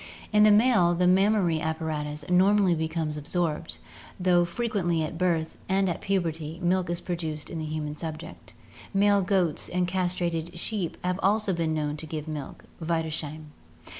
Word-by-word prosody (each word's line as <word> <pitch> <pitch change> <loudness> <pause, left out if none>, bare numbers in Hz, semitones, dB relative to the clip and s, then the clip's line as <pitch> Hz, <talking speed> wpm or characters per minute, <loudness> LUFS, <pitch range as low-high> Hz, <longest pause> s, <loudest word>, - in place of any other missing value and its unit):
In 210 - +5
the 215 - +7
male, 210 -5 +5
the 180 +1 +2
mammary 185 -3 +3
apparatus 155 -2 -3
normally 190 +1 +4
becomes 160 -1 -2
absorbed, 160 +1 -2 0.4
though 180 -1 +4
frequently 175 -4 -1
at 155 - -4
birth 165 -2 0
and 195 0 +2
at 175 - -2
puberty 165 -4 -2
milk 180 0 +1
is 175 0 -1
produced 160 -4 -4
in 165 - -4
the 155 - -3
human 150 -1 -4
subject. 160 -6 -8 0.4
Male 200 0 +4
goats 185 -4 +1
and 180 0 0
castrated 175 -2 -2
sheep 190 -1 -3
have 180 +1 -1
also 205 0 +2
been 165 -2 0
known 150 -1 -2
to 160 - -7
give 155 0 -5
milk 150 -3 -6 0.2
(Wiedersheim). 155 -2 -3
170 Hz, 155 wpm, -27 LUFS, 160-185 Hz, 0.4 s, the